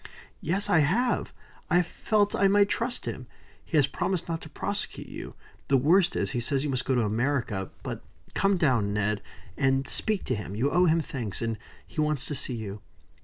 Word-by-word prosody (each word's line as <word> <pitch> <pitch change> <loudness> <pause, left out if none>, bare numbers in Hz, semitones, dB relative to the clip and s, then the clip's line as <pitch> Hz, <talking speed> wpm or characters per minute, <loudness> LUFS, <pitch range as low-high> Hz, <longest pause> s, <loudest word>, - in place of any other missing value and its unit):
"Yes, 190 +6 0
I 200 -5 +4
have. 220 - +1 0.4
I 180 0 +4
felt 205 +4 +1
I 195 - +4
might 200 0 +4
trust 245 +1 -2
him. - - -5 0.4
He 160 - -1
has 145 - +6
promised 175 +5 -2
not 165 -1 -3
to 160 - -10
prosecute 200 +6 -3
you. - - -8 0.3
The 135 - +4
worst 170 +7 +4
is, - - 0
he 125 - -1
says 135 +3 0
you 150 - -1
must 125 -1 0
go 130 - +1
to 120 - +3
America. 115 -3 -1
But - - -5 0.3
come 195 -1 +2
down, 120 - +2
Ned, 105 0 0 0.3
and 135 -1 +1
speak 215 -3 +2
to 130 - -1
him. 100 -2 -6
You 130 +7 +1
owe 180 0 +4
him 165 0 +3
thanks, 120 - -4
and 115 -1 -1 0.3
he 155 - -3
wants 150 -3 +1
to - - -3
see 130 -2 -2
you." 105 -2 -6
145 Hz, 200 wpm, -27 LUFS, 120-180 Hz, 0.4 s, has